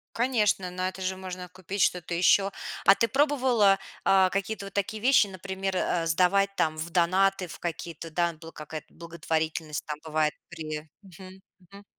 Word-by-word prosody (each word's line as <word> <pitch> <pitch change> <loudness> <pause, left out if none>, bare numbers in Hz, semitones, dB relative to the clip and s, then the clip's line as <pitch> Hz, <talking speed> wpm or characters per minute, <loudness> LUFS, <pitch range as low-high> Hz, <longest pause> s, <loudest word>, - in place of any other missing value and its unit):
Конечно, 220 -6 +1
на 185 +1 -2
это 190 - -10
же 190 0 -1
можно 185 -1 -7
купить 185 +2 -5
что-то 180 -1 +1
ещё. 195 +3 +4 0.3
А 195 - +8
ты 230 - +2
пробовала, 255 -8 +3 0.3
а, 190 -1 +5
какие-то 200 +2 -3
вот 195 - -9
такие 205 +2 -2
вещи, 255 -3 +5
например, 190 0 -4
э, 170 -2 0
сдавать 185 +4 +3
там 155 -4 0
в 160 +2 -4
донаты, 185 +2 +2
в - - -10
какие-то 170 -1 -5
да 170 +2 +1
н 165 - -17
бл 165 0 -10
какая-то 150 0 -9
благотворительность 160 -2 -3
там 150 -1 -4
бывает 155 -1 0 0.2
при 155 -2 -6
мгм 190 +1 -13 0.2
мгм. 200 +3 -16
185 Hz, 170 wpm, -27 LUFS, 165-195 Hz, 0.3 s, А